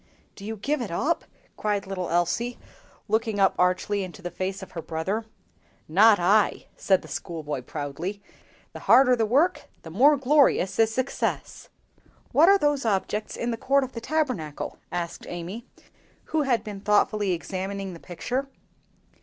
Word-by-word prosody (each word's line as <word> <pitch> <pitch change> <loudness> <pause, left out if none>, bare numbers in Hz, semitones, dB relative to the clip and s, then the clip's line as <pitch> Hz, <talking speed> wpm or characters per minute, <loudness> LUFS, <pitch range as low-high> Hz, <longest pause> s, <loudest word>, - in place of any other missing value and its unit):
"Do 195 - -12
you 220 +2 -5
give 280 +7 -1
it 230 - -4
up?" 300 - -1 0.3
cried 205 -2 -1
little 190 -2 -4
Elsie, 175 +8 0 0.5
looking 220 -2 0
up 195 -1 +4
archly 185 +3 +1
into 185 +1 -9
the 175 - -4
face 190 +2 -4
of - - -11
her 165 - -5
brother. 185 +8 -3 0.6
"Not 205 +6 +6
I!" 200 +4 +3
said 190 -2 +2
the - - -11
schoolboy 150 -5 -5
proudly. 150 +9 -5 0.5
"The - - -8
harder 255 +1 +6
the 225 -2 0
work, 300 +11 +2 0.2
the 160 - -9
more 280 - +5
glorious 265 -8 +3
is 225 0 +4
success!" 255 +3 -3 0.6
"What 325 +5 +6
are 400 - +7
those 290 -5 +1
objects 210 0 -1
in 240 - -2
the 230 - -3
court 275 +3 +2
of 260 - -5
the 230 - -7
Tabernacle?" 255 - -2
asked 170 -1 -4
Amy, 180 +8 -6 0.7
who 315 - +3
had 250 -6 +1
been 205 -2 -7
thoughtfully 210 -1 +2
examining 190 +2 -4
the 170 - -10
picture. 250 +12 -4
205 Hz, 160 wpm, -26 LUFS, 180-245 Hz, 0.7 s, are